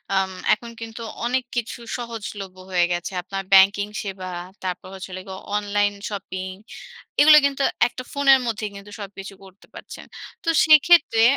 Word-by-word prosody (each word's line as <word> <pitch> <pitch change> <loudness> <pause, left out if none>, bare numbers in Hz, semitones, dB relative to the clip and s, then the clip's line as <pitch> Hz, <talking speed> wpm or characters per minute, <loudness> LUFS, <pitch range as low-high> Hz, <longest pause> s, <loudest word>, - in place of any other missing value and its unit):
আম 190 0 +1 0.2
এখন 235 +2 -4
কিন্তু 225 +1 -8 0.2
অনেক 255 +2 0
কিছু 240 0 -3 0.2
সহজলভ্য 210 -5 -7
হয়ে 175 -1 +3
গেছে। 175 +2 -2
আপনার 195 +2 -5
ব্যাংকিং 200 +1 +6 0.2
সেবা 190 -2 -6 0.4
তারপর 185 0 -4
হচ্ছে 190 0 -8
হলো 185 0 -6
গিয়ে 190 0 -8 0.2
অনলাইন 205 0 0 0.2
শপিং, 190 -2 -5 0.7
এগুলো 300 +1 +9
কিন্তু 280 0 0 0.2
একটা 255 - -8
ফোনের 275 -2 +5
মধ্যেই 220 -2 -3
কিন্তু 200 +1 -11
সবকিছু 195 0 -8
করতে 190 0 -17
পারছেন। - - -10 0.4
তো 330 - -1 0.2
সেক্ষেত্রে 310 -6 +6
205 Hz, 150 wpm, -23 LUFS, 190-240 Hz, 0.7 s, এগুলো